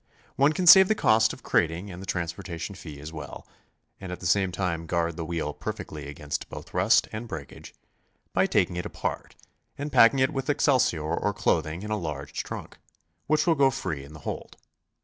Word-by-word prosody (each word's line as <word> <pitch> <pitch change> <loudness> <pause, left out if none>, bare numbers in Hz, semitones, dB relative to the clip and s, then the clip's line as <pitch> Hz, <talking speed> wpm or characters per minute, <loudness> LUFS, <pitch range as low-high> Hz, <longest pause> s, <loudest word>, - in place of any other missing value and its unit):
One 140 +3 +4
can 180 +3 -2
save 190 +2 +10
the 215 - +2
cost 110 - +4
of - - -11
crating 85 +5 0
and 90 +1 -8
the 95 - -9
transportation 85 +1 -4
fee 80 -6 -10
as 75 +3 -8
well, 80 - -8 0.5
and 95 -2 -7
at 90 - -6
the - - -9
same 95 +1 +2
time 85 -2 -2
guard 85 0 0
the 85 - -4
wheel 80 -2 -3
perfectly 75 0 -6
against 75 0 -5
both - - -10
rust - - +4
and 110 +2 -6
breakage, 75 -9 -9 0.6
by - - +3
taking 90 - +1
it 90 - -3
apart - - -5 0.4
and 145 +1 -4
packing 115 +2 +6
it 130 +3 +2
with 135 +1 -3
excelsior 130 - +2
or 85 +6 -1
clothing 80 +3 0
in 105 - -5
a 105 - +1
large 75 -6 -4
trunk, - - -8 0.5
which 155 +1 +2
will 170 - +4
go 140 -3 +4
free 95 - -4
in 70 +2 -13
the 75 - -11
hold. - - -6
90 Hz, 195 wpm, -26 LUFS, 80-115 Hz, 0.6 s, save